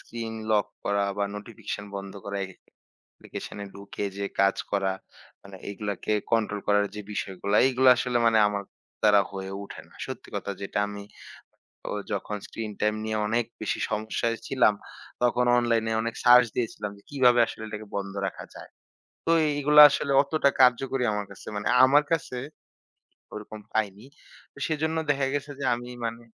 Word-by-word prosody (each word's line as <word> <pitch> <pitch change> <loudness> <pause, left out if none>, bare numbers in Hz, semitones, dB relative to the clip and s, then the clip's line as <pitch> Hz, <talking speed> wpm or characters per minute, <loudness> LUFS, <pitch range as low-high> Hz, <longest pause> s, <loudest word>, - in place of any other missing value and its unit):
Screen 115 -1 -6 0.2
lock 105 -2 +3 0.2
করা 100 0 +1
বা 100 - +2
notification 105 -1 -6
বন্ধ 100 0 -6
করা, 100 0 -4
একেক 95 -1 -12 0.4
অ্যাপ্লিকেশনে 100 - -9
ঢুকে 100 +1 -6
যে 100 0 -2
কাজ 100 0 +4
করা, 95 -1 +1 0.5
মানে 100 -1 -11
এগুলাকে 100 0 -3 0.2
কন্ট্রোল 105 -2 +1
করার 105 0 +4
যে 105 - -5
বিষয়গুলা, 100 +1 -2
এগুলা 130 0 +5
আসলে 125 -1 0
মানে 115 -1 +5
আমার 100 -1 -3 0.4
দ্বারা 105 -1 +6
হয়ে 95 -1 -5
উঠে 100 - -9
না। - - -22
সত্যি - - -8
কথা - - -4
যেটা, 100 - -3
আমি 100 0 -7 0.9
অ - - -4 0.2
যখন 105 +1 -3
স্ক্রিন 110 -2 -5
টাইম 105 0 +2
নিয়ে 110 0 -1
অনেক 115 +2 +1 0.2
বেশি 110 - -2
সমস্যায় 110 +2 -1
ছিলাম, 125 -5 +4 0.5
তখন 125 0 +3
অনলাইনে 115 -2 +1
অনেক 115 0 -3
সার্চ 125 0 +8
দিয়েছিলাম 110 -3 -3
যে, - - -18
কিভাবে 125 -4 +4
আসলে 110 - -8
এটাকে 105 0 -7
বন্ধ 100 -1 -3
রাখা - - -7
যায়। - - -11 0.6
তো, 165 - +2
এই 150 - +2
এইগুলা 150 +1 +7
আসলে 140 - -1
অতটা 140 0 +2
কার্যকরী 130 +1 +3
আমার 105 0 -2
কাছে, - - -13
মানে 105 - -3 0.2
আমার 140 +3 +6
কাছে 155 -6 -1 1.0
ওরকম 105 0 -8 0.2
পাইনি। 105 -1 -1 0.5
তো, - - -16
সেজন্য 160 0 -1
দেখা 140 -1 +2
গেছে 145 0 -3
যে, - - -3
আমি 120 +1 -7 0.2
মানে 115 +1 -5
110 Hz, 165 wpm, -26 LUFS, 100-125 Hz, 1.0 s, সার্চ